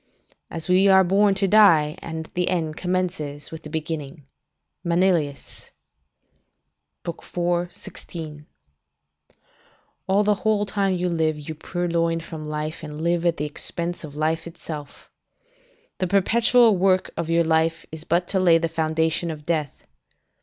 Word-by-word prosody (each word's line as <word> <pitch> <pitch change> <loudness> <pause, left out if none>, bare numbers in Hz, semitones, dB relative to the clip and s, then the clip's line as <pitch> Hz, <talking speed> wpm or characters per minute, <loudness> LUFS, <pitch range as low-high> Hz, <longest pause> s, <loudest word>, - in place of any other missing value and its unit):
["As 160 -1 -5
we 185 +2 +4
are 190 -1 +7
born 195 +2 +3
we 195 - +2
die, 175 -8 +5
and 160 -1 -6
the 180 0 0
end 160 -4 -1
commences 180 -6 -3
with 160 0 -8
the 150 - -10
beginning." 150 -2 -5 0.6
Manilius, 170 -5 0 1.4
Ast., 170 +1 -8
iv. 175 0 0
16.] 155 -4 -9 1.6
"All 195 +2 +3
the 210 0 +3
whole 215 -2 +2
time 195 -2 0
you 180 0 -1
live, 160 -3 0
you 150 +1 -6
purloin 170 0 -1
from 165 -1 -8
life 150 +1 -4
and 150 -1 -7
live 170 +1 +1
at 170 - +1
the 150 - -2
expense 170 +4 -2
of 145 -2 -9
life 160 +2 -1
itself. 160 -3 -9 0.9
The 185 - 0
perpetual 225 +3 +4
work 185 0 +2
of 165 -1 -3
your 170 0 +3
life 160 0 +1
is 160 -1 -5
but 175 +2 0
to 190 - +1
lay 175 -3 +5
the 165 0 0
foundation 160 +1 0
of 150 -2 -7
death. 155 -4 -2
165 Hz, 145 wpm, -23 LUFS, 155-185 Hz, 1.6 s, are